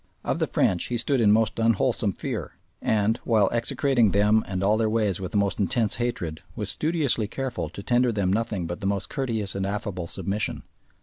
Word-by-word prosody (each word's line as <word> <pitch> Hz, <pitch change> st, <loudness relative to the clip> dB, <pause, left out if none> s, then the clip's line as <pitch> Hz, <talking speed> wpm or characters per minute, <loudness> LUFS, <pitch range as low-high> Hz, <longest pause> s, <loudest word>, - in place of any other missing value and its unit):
Of -, -, -1 dB
the -, -, +1 dB
French 90 Hz, -, +1 dB
he 120 Hz, -, -2 dB
stood 125 Hz, +2 st, +1 dB
in 105 Hz, -2 st, +5 dB
most 110 Hz, +1 st, +2 dB
unwholesome 115 Hz, -2 st, +2 dB
fear, -, -, -5 dB, 0.3 s
and, 110 Hz, 0 st, +1 dB
while 110 Hz, -4 st, +3 dB
execrating 120 Hz, 0 st, +2 dB
them 105 Hz, +3 st, +3 dB
and 95 Hz, 0 st, -2 dB
all 105 Hz, +2 st, +4 dB
their 110 Hz, 0 st, +1 dB
ways 105 Hz, -5 st, 0 dB
with 90 Hz, -2 st, -5 dB
the -, -, 0 dB
most 100 Hz, -1 st, 0 dB
intense 105 Hz, +2 st, +1 dB
hatred, 115 Hz, -10 st, -3 dB
was -, -, +1 dB
studiously 150 Hz, -9 st, +1 dB
careful 120 Hz, -, -4 dB
to 100 Hz, +4 st, -9 dB
tender 125 Hz, +1 st, +2 dB
them 100 Hz, -4 st, 0 dB
nothing 105 Hz, -4 st, -1 dB
but 85 Hz, +5 st, -5 dB
the 95 Hz, -, -1 dB
most 100 Hz, -1 st, -1 dB
courteous 115 Hz, -8 st, -2 dB
and 95 Hz, -, -2 dB
affable 100 Hz, -3 st, -3 dB
submission. 95 Hz, +4 st, -3 dB
105 Hz, 195 wpm, -25 LUFS, 95-115 Hz, 0.3 s, in